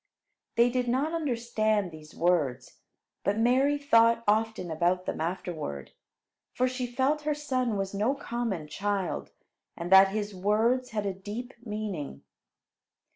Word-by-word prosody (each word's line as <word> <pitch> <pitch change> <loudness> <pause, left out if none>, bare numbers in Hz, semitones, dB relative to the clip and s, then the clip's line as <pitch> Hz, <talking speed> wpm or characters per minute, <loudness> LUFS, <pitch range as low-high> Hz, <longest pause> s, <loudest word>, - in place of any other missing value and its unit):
They 235 +1 +4
did 250 0 0
not 270 +7 0
understand 230 - 0
these 155 0 -13
words; 165 -7 0 0.4
but 200 +1 +1
Mary 260 +5 +3
thought 230 -5 +4
often 215 -4 +1
about 175 +3 +1
them - - -3
afterward; 160 - -4 0.6
for 255 - +2
she 255 -1 -3
felt 265 +5 +1
her 300 0 0
son 255 -6 -1
was 195 0 -3
no 215 +7 +1
common 235 - -3
child, 200 +2 -2 0.5
and 170 +2 -5
that 190 0 +9
his 205 +1 -3
words 220 +7 +1
had 210 -3 -2
a 195 - -1
deep 210 +7 -7
meaning. 210 - -5
215 Hz, 135 wpm, -28 LUFS, 185-250 Hz, 0.6 s, that